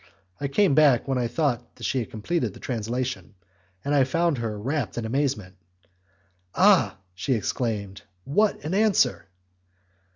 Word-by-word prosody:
I 140 - -1
came 150 +3 +3
back 140 -5 +4
when 135 -2 0
I 120 - 0
thought 125 -3 -2
that - - -13
she 135 - 0
had 115 - -4
completed 155 +11 -2
her - - -12
translation, 120 -1 -3 0.5
and 145 - 0
I 140 -2 +5
found 165 +1 +1
her 110 -2 -3
wrapped 135 +8 -3
in 115 - -2
amazement. 115 -7 -2 1.0
"Ah, 180 - +5
sir!" 95 - -34
she 95 +9 -1
exclaimed, 105 -3 -3 0.2
"what 200 - +1
an 160 - -2
answer!" 195 - +2
130 Hz, 155 wpm, -25 LUFS, 110-150 Hz, 1.0 s, I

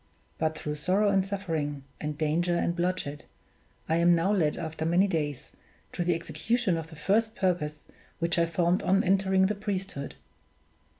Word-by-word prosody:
But, 155 0 0
through 150 -1 -3
sorrow 200 +5 +3
and 195 -1 +3
suffering, 165 -8 -3 0.2
and 150 -1 -4
danger 165 +3 +1
and 170 - 0
bloodshed, 175 -5 -2 0.6
I 160 - +2
am 170 +1 +5
now 180 +5 +2
led, 160 -7 +1
after 160 -2 -4
many 175 +4 +4
days, 150 -7 -2 0.4
to 175 - -1
the 175 0 +2
execution 205 +4 0
of 165 -1 -4
that 160 - -11
first 220 +7 +1
purpose 160 -7 -1 0.3
which 170 +1 0
I 170 - +3
formed 170 +2 +1
on 195 +2 +3
entering 190 0 +3
the 205 - +1
priesthood. 195 -8 -4
175 Hz, 165 wpm, -28 LUFS, 160-190 Hz, 0.6 s, am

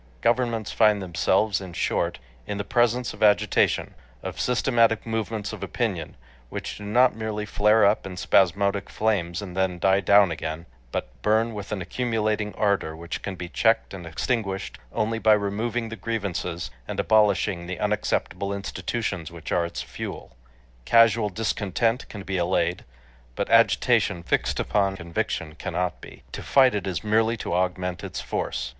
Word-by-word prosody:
Governments 115 -3 +1
find 105 -2 +4
themselves, 95 +3 +1
in 95 -2 -8
short, 80 - -1 0.3
in 105 - -3
the 100 - -2
presence 120 +2 +1
of - - -13
Agitation, 105 -1 +3 0.3
of - - -6
systematic 115 -3 +2
movements 110 -2 -3
of - - -8
opinion, - - -3 0.3
which - - -5
do - - -8
not 120 +4 +4
merely 110 -1 -3
flare 105 +1 +4
up 100 +2 +3
in 90 -1 -8
spasmodic 100 +2 +2
flames 95 -5 -1
and 90 -3 -8
then 95 -2 0
die 95 +2 +3
down 100 -1 +5
again, 80 +1 -4 0.3
but - - -3
burn 110 - +2
with 105 -1 -7
an 100 -4 -2
accumulating 110 0 -1
ardor 100 -6 0
which 85 +1 -6
can 95 - -5
be 90 0 -6
checked 115 +5 +1
and 90 -3 -8
extinguished 95 +1 -2
only 115 +1 -1
by 110 -1 +5
removing 110 +3 -1
the 115 - -6
grievances, 100 -7 -3 0.2
and - - -4
abolishing 100 -4 +2
the 90 0 -5
unacceptable 105 -1 -1
institutions 100 -3 -3
which 85 -2 -9
are 85 -1 +2
its - - -5
fuel. - - -7 0.5
Casual 115 - +4
discontent 115 +3 -1
can 100 -3 -8
be 95 -1 -2
allayed, 90 0 0 0.5
but - - -2
agitation 85 -1 +3
fixed - - 0
upon 100 -2 +1
conviction 85 -2 -3
cannot 90 +3 -3
be. - - -12
To - - -6
fight 130 -2 +4
it 100 -3 -2
is 95 +1 -3
merely 110 +2 +2
to 100 - -4
augment 90 0 -1
its - - -5
force. - - -3
100 Hz, 160 wpm, -25 LUFS, 90-110 Hz, 0.5 s, down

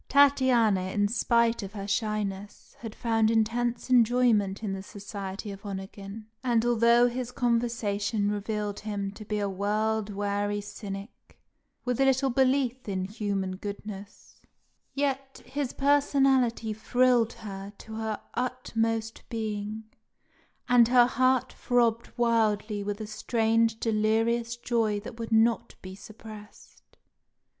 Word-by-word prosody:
Tatiana, 250 -9 +4
in 205 0 +2
spite 235 0 +2
of 200 0 -7
her 200 -2 -6
shyness, 205 -1 -3
had 225 -2 -8
found 225 -2 +2
intense 230 +2 0
enjoyment 230 -4 +3
in 200 -3 -2
the 190 - -4
society 200 0 -7
of 195 +1 -10
Onegin; 195 +1 -7 0.2
and 235 -2 +2
although 235 0 +5
his 245 0 -4
conversation 225 -4 0
revealed 210 0 -3
him 205 -2 -4
to 210 +2 -10
be 210 0 -3
a 205 -1 0
world 210 +2 -1
weary 205 0 -1
cynic, 205 +1 -9 0.5
with 250 0 -1
little 270 0 +3
belief 260 -2 +1
in 185 -1 -1
human 195 -2 -3
goodness, 205 0 -9 0.5
yet 275 -1 -2
his 265 +1 -3
personality 270 -5 +2
thrilled 245 +1 +2
her 195 -2 -8
to 220 - -11
her 220 -1 -3
utmost 225 -3 -2
being, 215 -2 -4 0.8
and 245 -2 +6
her 245 0 +6
heart 255 +1 +1
throbbed 235 -2 +1
wildly 215 -3 +1
with 205 +1 -3
a - - -3
strange 225 +1 +1
delirious 225 +2 +1
joy 230 -3 0
that 225 +2 -10
would 230 0 -5
not 230 +1 +2
be 185 0 -8
suppressed. 215 +1 -13
220 Hz, 125 wpm, -28 LUFS, 205-240 Hz, 0.8 s, and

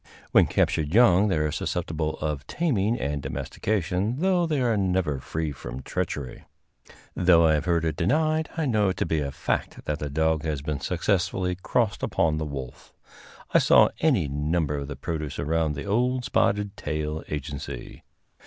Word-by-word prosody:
When - - +6
captured 75 +3 0
young 105 -4 +6
they 95 - +1
are 75 0 0
susceptible 80 -1 -2
of 75 -2 -3
taming 120 - 0
and 70 0 -2
domestication, 95 - -2
though 180 +1 +2
they 150 -3 0
are 120 -3 +2
never 90 -8 0
free 80 +3 -3
from 65 -1 -8
treachery. 65 -4 -4 0.7
Though 85 -2 +5
I 80 - +4
have 75 - 0
heard 85 -2 +1
it 80 -2 -1
denied, 155 - +1
I 160 - 0
know 105 -6 +2
it 95 - -3
to - - 0
be 80 -1 0
a 70 -2 -2
fact - - -3
that 75 0 -2
the 75 - -3
dog 80 +1 +1
has 75 -3 -3
been 75 -2 -2
successfully 90 +3 0
crossed 105 +4 -1
upon 80 -2 +1
the 80 - -2
wolf. 70 -4 -8 0.6
I - - +7
saw - - +6
any 130 - +2
number 75 +2 -1
of 70 -1 -4
the 70 - -5
produce 75 0 -4
around 80 0 0
the 70 - -5
old 125 +5 +1
Spotted 105 0 +1
Tail 75 -1 -3
agency. 70 -4 -6
80 Hz, 170 wpm, -26 LUFS, 75-100 Hz, 0.7 s, I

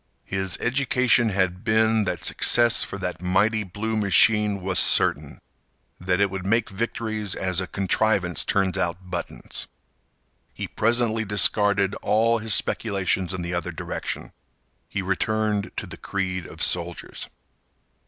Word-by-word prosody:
His 95 -1 -1
education 125 -2 +2
had 95 -1 -1
been 110 -1 +2
that 90 -3 -3
success 120 -1 +4
for - - -4
that 90 -2 -5
mighty 105 +4 +1
blue 105 +4 -4
machine 105 0 +3
was 95 -1 +1
certain; - - +2 0.6
that 90 0 -1
it 100 -1 +2
would 95 -1 -5
make 110 +3 0
victories 110 -1 -3
as 90 -1 -1
a 95 - -4
contrivance 95 -3 0
turns 95 -1 0
out 90 0 -3
buttons. - - -4 0.9
He - - -5
presently 115 0 +1
discarded 100 -1 +3
all 115 +2 +2
his 110 -1 +3
speculations 95 -4 -1
in 90 -2 -4
the 85 +1 -4
other 90 0 -3
direction. 80 - -6 0.6
He 100 - -3
returned 105 +2 -1
to - - -3
the - - -10
creed 90 -3 -4
of - - -6
soldiers. - - -2
100 Hz, 135 wpm, -24 LUFS, 95-110 Hz, 0.9 s, success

